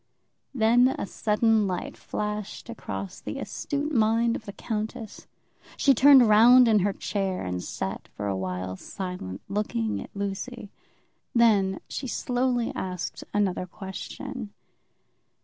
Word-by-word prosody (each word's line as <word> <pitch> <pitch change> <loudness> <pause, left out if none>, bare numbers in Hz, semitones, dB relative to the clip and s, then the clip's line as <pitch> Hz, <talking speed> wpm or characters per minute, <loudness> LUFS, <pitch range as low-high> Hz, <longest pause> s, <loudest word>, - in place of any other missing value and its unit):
Then 240 +1 +5
a - - -2
sudden 215 +1 +2
light 180 -2 -4
flashed 210 +2 -5
across 195 -4 -6
the - - -5
astute 295 +1 -3
mind 230 0 +3
of 220 - -7
the - - -4
countess. 215 +1 -5 0.5
She 275 - +5
turned 265 -1 +7
round 240 +4 +7
in 215 -2 +5
her 200 +2 +2
chair, 195 -1 -2
and 90 0 -3
sat - - -5
for 105 - -7
awhile 95 -1 -3
silent, 180 - -6
looking 115 - -1
at - - -9
Lucy. 200 +2 -5 0.6
Then 205 -5 +4
she 265 - -5
slowly 245 0 0
asked 180 -8 -4
another 190 -3 0
question. 205 +6 -7
210 Hz, 125 wpm, -26 LUFS, 190-235 Hz, 0.6 s, turned